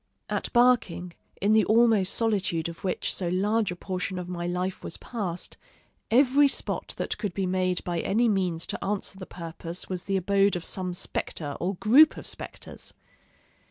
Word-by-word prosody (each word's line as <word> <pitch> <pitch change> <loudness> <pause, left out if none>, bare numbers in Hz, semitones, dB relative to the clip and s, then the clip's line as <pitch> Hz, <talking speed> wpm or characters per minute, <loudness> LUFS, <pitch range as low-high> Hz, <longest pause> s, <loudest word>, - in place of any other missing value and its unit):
At - - -2
Barking, 240 -8 +3 0.3
in 205 +2 +3
the 220 -1 +5
almost 220 -4 +4
solitude 195 -8 0
of 170 0 -9
which 185 -2 -1
so 180 - -2
large 205 +4 +1
a - - -4
portion 185 +1 -4
of 180 -1 -5
my 175 -1 -4
life 180 +1 -2
was - - -5
passed, 190 -8 -5 0.5
every 270 +4 +5
spot 275 - -1
that - - -3
could 200 -6 -3
be 195 - 0
made 185 -1 0
by 175 -1 -2
any 225 +8 +2
means 180 -6 0
to - - -4
answer 195 -1 -3
the 185 - -8
purpose 170 0 -7
was 185 -1 -4
the 195 -1 0
abode 195 +1 +2
of 175 - -4
some 185 -2 -2
spectre 145 -4 -3
or 190 +3 -1
group 260 - +6
of - - -8
spectres. - - -8
190 Hz, 175 wpm, -27 LUFS, 180-215 Hz, 0.5 s, group